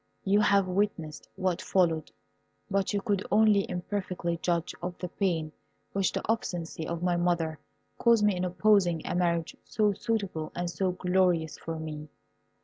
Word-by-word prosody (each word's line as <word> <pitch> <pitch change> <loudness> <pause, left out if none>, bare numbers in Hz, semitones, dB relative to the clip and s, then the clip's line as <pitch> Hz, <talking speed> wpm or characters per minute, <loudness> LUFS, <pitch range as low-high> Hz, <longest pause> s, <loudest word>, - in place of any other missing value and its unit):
You 200 +1 +3
have 200 -2 +4
witnessed 180 -5 -2
what 185 -3 -1
followed, 165 -4 +1 0.6
but 195 -1 +1
you 205 -1 0
could 200 -3 0
only 210 -2 +4
imperfectly 180 -2 -3
judge 170 -2 0
of 175 0 -4
the 180 - -5
pain 165 -5 -1 0.4
which 195 -1 +1
the - - -4
obstinacy 175 -8 -2
of 170 0 -3
my 175 -1 +2
mother 170 -3 0 0.4
caused 235 -3 +4
me 205 -2 +3
in 180 - -2
opposing 180 -2 +3
a - - -2
marriage 170 -2 0
so 210 -2 +1
suitable 200 -7 -2
and 175 0 -2
so 185 +1 0
glorious 180 -3 +1
for 165 -1 -5
me. 155 -1 -6
180 Hz, 155 wpm, -29 LUFS, 170-200 Hz, 0.6 s, have